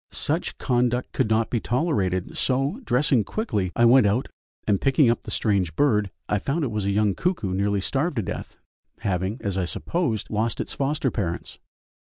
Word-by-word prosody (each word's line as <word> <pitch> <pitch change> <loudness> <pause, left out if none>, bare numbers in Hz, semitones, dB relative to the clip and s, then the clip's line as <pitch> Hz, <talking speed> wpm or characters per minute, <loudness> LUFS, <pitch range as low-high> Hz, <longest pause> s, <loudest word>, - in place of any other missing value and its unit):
Such - - -2
conduct 125 0 0
could - - 0
not 110 0 +1
be 120 - +1
tolerated, 105 - 0
so, 135 - 0
dressing 130 - +2
quickly, 105 - -2
I 120 - +4
went 120 -2 +6
out, 110 +6 0 0.4
and 100 -2 +1
picking 135 -2 +4
up 120 - -2
the - - -9
strange 95 -7 0
bird 105 -8 +2 0.2
I 105 - +1
found 145 - -1
it 130 - -1
was 105 -2 -2
a - - +1
young 105 0 +2
cuckoo 165 - -1
nearly 100 +1 +1
starved 140 - -1
to 110 - 0
death, - - -6 0.4
having, 95 +4 -1
as 95 -2 -1
I 90 - 0
supposed, 120 - -2
lost 110 +1 -1
its - - -3
foster 140 -1 0
parents. 90 -6 -4
110 Hz, 185 wpm, -24 LUFS, 100-135 Hz, 0.4 s, went